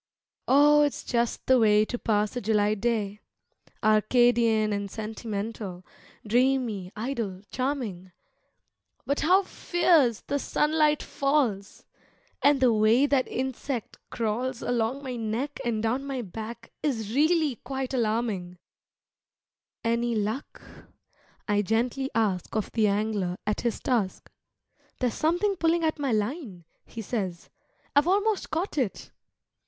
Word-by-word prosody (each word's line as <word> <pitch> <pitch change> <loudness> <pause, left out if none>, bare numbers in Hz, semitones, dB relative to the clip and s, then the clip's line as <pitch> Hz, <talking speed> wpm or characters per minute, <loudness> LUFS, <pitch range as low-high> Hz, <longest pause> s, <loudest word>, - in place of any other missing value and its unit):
Oh, 295 +2 +6
it's 290 -1 0
just 235 -1 -1
the 260 -1 +5
way 215 -1 +5
to 245 +2 -4
pass 210 +1 0
a 245 - -2
July 210 0 +2
day, 210 -2 -1 0.6
Arcadian 220 0 +3
and 200 0 -3
sentimental, 215 -3 -5 0.4
dreamy, 235 -5 +1
idle, 215 -5 -4
charming, 245 -9 -3 0.9
But 280 - 0
how 370 +6 +4
fierce 335 - +2
the 285 - -2
sunlight 300 +1 +2
falls! 265 -9 -1 0.6
and 285 -1 +4
the 255 -3 +4
way 220 +5 +4
that 275 -2 +2
insect 260 -1 -4
crawls 235 +2 -2
Along 245 +3 -1
my 255 -2 -4
neck 230 +6 -3
and 230 -3 -1
down 250 +5 0
my 270 -3 -3
back 220 +4 -8
is 225 -7 -2
really 305 -2 +2
quite 265 +2 -5
alarming 215 -7 -1 1.3
"Any 235 0 0
luck?" 215 +6 -3 0.8
I 205 -1 +2
gently 240 +6 0
ask 205 -5 0
of 215 - -1
the 220 -2 +2
angler 200 -3 -1
at 210 - -1
his 235 -2 -1
task, 225 -7 -1 0.7
"There's 250 -2 0
something 355 +5 +1
pulling 335 0 +2
at 315 -1 0
my 275 -3 0
line," 215 - -3 0.2
he 225 - -7
says; 190 -6 -4 0.4
"I've 290 +3 +4
almost 410 +2 +1
caught 330 -1 -2
it." 235 -7 -3
235 Hz, 125 wpm, -27 LUFS, 215-275 Hz, 1.3 s, Oh